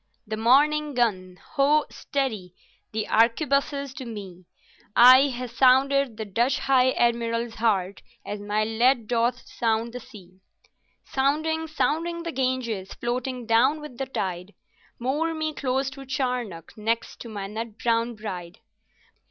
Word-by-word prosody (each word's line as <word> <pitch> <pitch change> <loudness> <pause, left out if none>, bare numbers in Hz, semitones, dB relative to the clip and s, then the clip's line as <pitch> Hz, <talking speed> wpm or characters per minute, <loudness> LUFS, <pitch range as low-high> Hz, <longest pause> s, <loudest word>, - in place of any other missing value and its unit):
"The 215 0 -4
morning 290 +6 +3
gun—Ho, 240 +7 +1
steady! 220 - -3 0.4
the 215 0 -2
arquebuses 275 +4 +1
to - - -5
me! 195 -6 -9 0.5
I 255 +3 +8
ha' 250 -1 -4
sounded 265 0 +3
the 220 - -4
Dutch 235 +6 +1
High 260 -1 +3
Admiral's 235 -1 0
heart 200 -4 0 0.2
as 205 - -5
my 205 +1 -1
lead 230 +2 +2
doth 240 +1 0
sound 230 0 -1
the 250 - -5
sea. 190 -7 -15 0.7
"Sounding, 315 +4 0
sounding 320 +4 -1
the 335 - -4
Ganges, 255 -7 -2
floating 250 +1 -3
down 245 +7 +3
with 295 -5 -10
the 270 - -2
tide, 185 -5 -4 0.4
Moore 300 +7 -1
me 310 0 -2
close 265 -1 -1
to 275 -1 -11
Charnock, 250 - -3
next 225 +2 -2
to 235 - -8
my 205 -3 -5
nut 220 +2 -6
brown 230 0 0
bride. 185 -5 -7
240 Hz, 135 wpm, -25 LUFS, 220-275 Hz, 0.7 s, I